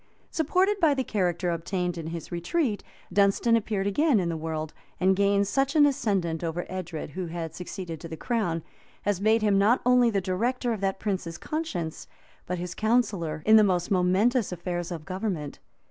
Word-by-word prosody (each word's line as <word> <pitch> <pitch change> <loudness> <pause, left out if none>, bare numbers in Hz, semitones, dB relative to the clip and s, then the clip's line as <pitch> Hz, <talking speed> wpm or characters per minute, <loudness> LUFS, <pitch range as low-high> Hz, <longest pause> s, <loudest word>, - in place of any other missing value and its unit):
] - - -37
Supported 370 +6 +1
by 310 -5 +4
the 265 - 0
character 180 -5 0
obtained 175 +1 -2
in 165 -2 -6
his 165 +1 -6
retreat, 205 - -1 0.3
Dunstan 200 +4 +4
appeared 210 -3 -1
again 250 +5 +3
in 175 -2 -1
the 165 - -2
world; 155 -1 -4 0.3
and 190 +1 +4
gained 200 0 +2
such 270 +6 0
an 295 -2 +7
ascendent 200 - 0
over 170 +1 -2
Edred 175 -5 -5
who 180 +4 -4
had 165 -1 -5
succeeded 180 -2 -6
to 170 - -7
the 160 -1 -7
crown, 175 -9 -1 0.4
as 205 -2 0
made 220 +1 +3
him 200 -2 +3
not 220 +5 +4
only 250 -1 +5
the 205 -3 +1
director 230 +7 -1
of 210 - -5
that 195 -1 -1
prince's 185 -5 -3
conscience, 195 - -4 0.4
but 180 - -2
his 175 0 -5
counsellor 205 -9 0
in 220 +1 +7
the 215 - +7
most 180 -3 +1
momentous 195 +6 +2
affairs 175 0 -4
of 160 -3 -6
government. 185 -6 -4
190 Hz, 185 wpm, -27 LUFS, 170-225 Hz, 0.4 s, an